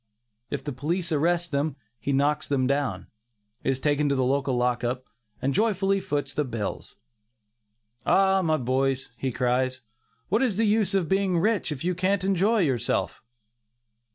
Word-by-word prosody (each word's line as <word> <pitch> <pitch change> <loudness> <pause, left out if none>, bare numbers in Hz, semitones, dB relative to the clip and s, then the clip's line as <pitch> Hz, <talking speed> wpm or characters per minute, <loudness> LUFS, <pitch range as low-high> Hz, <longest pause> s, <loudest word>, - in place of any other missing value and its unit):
If 140 -2 -4
the 145 - -4
police 170 +7 -2
arrest 170 +2 +1
them, 140 0 0 0.2
he 140 - -2
knocks 145 +2 +1
them 135 -2 +1
down, 140 -1 -1 0.6
is 135 0 0
taken 145 +1 +1
to 140 - +2
the 130 - +1
lock 125 -2 +1
up, 125 +2 -2 0.3
and 135 +1 0
joyfully 195 0 +2
foots 145 -5 -2
the 150 - 0
bills. 115 -6 -5 1.1
"Ah! 190 0 +4
my 160 -3 +2
boys," 130 0 0
he 130 +1 -2
cries, 130 +1 0 0.5
"what 215 +6 +2
is 235 -8 +1
the 225 - +3
use 210 -2 +2
of 185 -4 +1
being 190 -1 +1
rich, 205 -1 +1
if 145 -1 -5
you 180 +1 +1
can't 185 +2 0
enjoy 195 +3 +2
yourself?" 130 - 0
145 Hz, 155 wpm, -26 LUFS, 130-185 Hz, 1.1 s, Ah